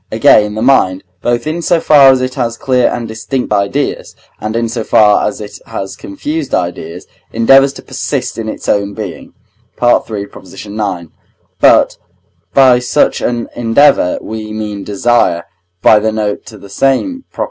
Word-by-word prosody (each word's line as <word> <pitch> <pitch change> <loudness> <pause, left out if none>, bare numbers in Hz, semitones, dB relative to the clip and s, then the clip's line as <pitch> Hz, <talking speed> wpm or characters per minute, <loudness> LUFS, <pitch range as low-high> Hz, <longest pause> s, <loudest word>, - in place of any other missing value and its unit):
Again, 105 0 +4
the 110 - -2
mind, 95 -8 +2 0.2
both 120 +1 -1
in 160 +3 -3
so 170 0 +2
far 145 -4 +6
as 130 -1 +3
it 130 0 -2
has 120 -3 -3
clear 125 -2 +1
and 120 - -4
distinct 110 +2 -3
ideas, 105 +8 -2 0.2
and 110 +1 -4
in 115 0 0
so 115 0 -4
far 105 -1 +3
as 105 - -5
it 105 -1 -9
has 95 0 -6
confused 145 +8 -4
ideas, 85 -1 -4 0.3
endeavours 135 +4 +4
to - - -12
persist - - -4
in 110 -1 -4
its - - -7
own 100 -1 0
being - - -8 0.4
(III. 115 -4 +1
ix.); 95 -1 -12 0.9
but - - +4 0.5
by 130 -2 +5
such 125 - +1
an 120 -1 -2
endeavour 120 -3 +3
we 110 -1 -6
mean 105 -2 -5
desire 100 -4 +1 0.4
(by 110 - +6
the 110 +1 -1
note 105 -1 -3
to 110 - -11
the 100 - -13
same 135 - -1
Prop.) - - -16
115 Hz, 160 wpm, -13 LUFS, 105-130 Hz, 0.9 s, far